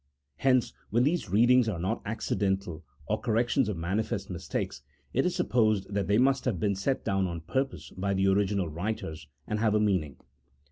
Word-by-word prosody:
Hence, 130 +3 +2 0.2
when 120 +2 +3
these 150 - 0
readings 120 +4 +5
are 100 - -2
not 95 +7 -2
accidental 95 -6 -1 0.2
or - - 0
corrections 120 +2 +1
of 100 - -3
manifest 95 +3 -2
mistakes, 70 -6 -4 0.3
it 135 +7 +2
is 180 - -1
sup 180 - -1
posed 110 -4 +2
that 100 -1 0
they 100 +1 +3
must 135 +1 +3
have 110 -9 0
been 100 +2 +1
set 100 +8 -1
down 95 -1 +1
on 85 -2 -5
purpose 135 +10 -3
by 100 +1 -2
the 95 +1 +2
original 100 -1 +2
writers, 85 -2 -4 0.2
and 105 - -2
have 110 -1 +2
a - - +4
meaning. 95 -9 +1
105 Hz, 185 wpm, -29 LUFS, 95-120 Hz, 0.3 s, readings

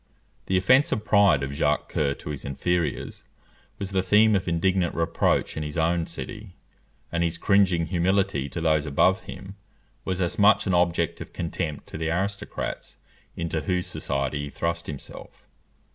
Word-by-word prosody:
The 95 - +2
offensive 110 +2 +3
pride 100 -10 +4
of 70 +1 -4
Jacques 75 0 0
Coeur 70 -2 0
to 75 - -7
his 70 - -5
inferiors 80 +3 -2 0.5
was 100 -1 -5
the 95 -1 +2
theme 105 +3 +4
of 95 -1 -1
indignant 90 +1 +1
reproach 85 -1 +1
in - - -3
his 75 +1 -5
own 85 +1 +1
city, 105 +2 -8 0.6
and 85 - -1
his 85 0 -1
cringing 95 -3 +3
humility 90 -4 0
to - - -5
those 80 -2 +1
above 90 +7 +2
him 95 +1 -9 0.5
was 95 -1 -2
as 90 +1 -1
much 105 +1 +5
an 95 - 0
object 85 -1 +1
of - - -9
contempt 80 -2 -4
to - - -7
the 80 0 -1
aristocrats 100 +4 -3 0.4
into 80 -1 -2
whose 90 +4 -1
society 70 +1 -2
he - - -7
thrust 85 +3 -3
himself. 70 -2 -9
85 Hz, 160 wpm, -25 LUFS, 80-95 Hz, 0.6 s, much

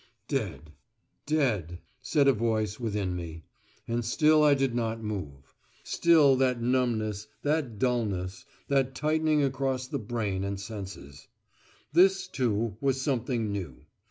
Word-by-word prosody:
"Dead. 80 - -3 0.6
Dead," 110 - 0 0.2
said 140 +2 +2
a 135 - +6
voice 110 -2 -1
within 105 -6 -2
me. 80 -2 -7 0.4
And 120 +1 -1
still 155 +7 +4
I 145 -1 +6
did 135 -3 0
not 115 -1 -1
move. 75 -11 -6 0.3
Still 155 -5 +5
that 130 -2 +2
numbness, 115 -4 0 0.2
that 145 -7 0
dulness, 105 -4 -1 0.2
that 135 -2 +1
tightening 155 0 +2
across 135 -1 -1
the - - -4
brain 105 -4 -2
and 100 0 -3
senses. 95 -9 -8 0.7
This, 190 +3 +4
too, 115 -4 -1
was 135 -1 +1
something 120 -5 -1
new. 90 -10 -6
120 Hz, 130 wpm, -28 LUFS, 100-135 Hz, 0.7 s, a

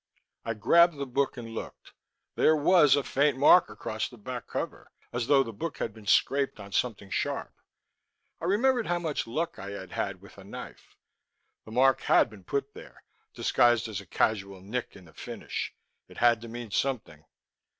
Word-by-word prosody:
I 115 -1 -3
grabbed 170 +9 +5
the 140 - -3
book 135 +1 -1
and 115 -2 -7
looked. - - -8 0.4
There 155 - +4
was 150 -2 +5
a 145 - 0
faint 140 0 +1
mark 160 +6 +6
across 110 0 -4
the 120 - -14
back 125 +3 -7
cover, - - -5 0.2
as 120 -1 -2
though 140 -2 +5
the 115 -3 -8
book 165 +11 -5
had 110 - -3
been 105 -1 -14
scraped 140 +6 +2
on 100 0 -10
something 100 -4 -2
sharp. - - -2 0.9
I - - -3
remembered 235 +5 +2
how 175 0 +1
much 160 -8 -3
luck 160 +9 -3
I 100 - -6
had 100 -2 -8
had 100 -2 -3
with 100 +1 -15
a - - -11
knife. 100 - -11 0.7
The 110 - -11
mark 130 +3 +4
had - - +4
been 100 -3 -14
put 140 +4 -2
here, - - -13 0.3
disguised 120 -1 +3
as 105 -2 -5
a 100 - -16
casual 100 -1 0
nick 115 +6 -4
in 95 - -14
the 80 - -18
finish. - - -6 0.3
It - - -15
had 120 -2 +4
to 115 - -8
mean 115 -1 -7
something. 110 - -2
120 Hz, 185 wpm, -28 LUFS, 105-140 Hz, 0.9 s, mark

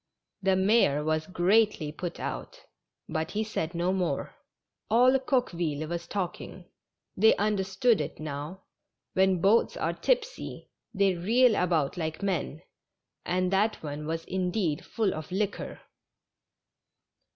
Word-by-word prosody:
The 190 -1 +3
mayor 190 -7 +3
was 155 0 0
greatly 185 -3 +2
put 170 +3 -6
out, - - -5 0.5
but 160 0 -2
he 215 +1 -1
said 175 -6 -3
no 175 +2 +1
more. 185 -2 -2 0.6
All 255 +4 +5
Coqueville 175 - -1
was 170 +1 -4
talking; 185 -1 -5 0.5
they 220 +4 +5
understood 205 +2 +1
it - - -6
now. 155 +5 -6 0.5
When 190 -2 +3
boats 210 +5 +3
are - - -1
tipsy - - -2 0.2
they 200 -3 +2
reel 225 +8 +4
about 165 -5 +1
like 160 +2 -4
men, 175 -4 -2 0.6
and 185 +1 +1
that 210 +1 +1
one 150 0 -5
was, 165 +1 -3
indeed, 180 -4 -1
full 220 -4 -1
of 155 +1 -7
liquor. 200 +2 -3
185 Hz, 125 wpm, -28 LUFS, 160-210 Hz, 0.6 s, All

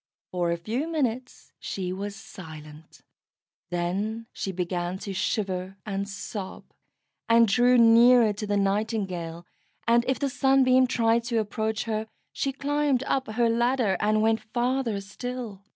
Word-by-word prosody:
For 175 -1 0
a 170 - 0
few 230 - -3
minutes 255 -6 -3
she 185 -2 -4
was 200 +2 -5
silent; 160 -7 -12 0.7
then 195 +6 -2
she 195 - -3
began 180 0 -2
to 195 0 -6
shiver 190 -1 -2
and 200 -1 -3
sob, 200 -1 -6 0.7
and 230 0 +6
drew 245 +4 +4
nearer 230 -1 +6
to 205 +1 -5
the 205 0 +1
Nightingale, 195 -5 -2 0.4
and 235 +1 +4
if 260 - +1
the 280 - -1
Sunbeam 265 -1 +4
tried 235 -2 +2
to 235 -1 -1
approach 220 0 -1
her, 220 -1 -3 0.3
she 275 - -1
climbed 285 -1 0
up 270 -1 -1
her 235 +1 +2
ladder, 235 -3 +2
and 215 +1 +2
went 225 0 +3
farther 240 -1 -1
still. 225 0 -6
220 Hz, 140 wpm, -26 LUFS, 195-245 Hz, 0.7 s, and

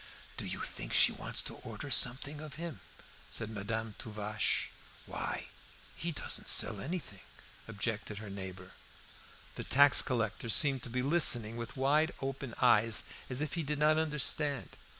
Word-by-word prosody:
"Do - - -4
you - - -4
think - - -5
she - - +6
wants - - -2
to - - -5
order - - -9
something 140 +4 +1
of 155 -2 -9
him?" 165 -1 -7 0.5
said 110 - -3
Madame 110 +1 -4
Tuvache. 105 -2 -2 0.3
"Why, 65 0 -6 0.5
he 170 +2 -4
doesn't 150 - -1
sell - - +5
anything," 145 - -6 0.5
objected 105 - -4
her 105 -1 -8
neighbour. 95 -1 -8 0.9
The - - -5
tax 140 +2 +7
collector 115 -2 -3
seemed 135 +3 +5
to 125 - -3
be 125 +2 -3
listening 125 -7 +6
with 115 +2 -8
wide 150 +5 +1
open 135 -2 -6
eyes, 115 -3 +3 0.3
as 130 +2 +1
if 150 -2 -3
he 170 - -2
did 150 0 -3
not 155 +1 +3
understand. 150 -2 -1
125 Hz, 150 wpm, -31 LUFS, 110-150 Hz, 0.9 s, tax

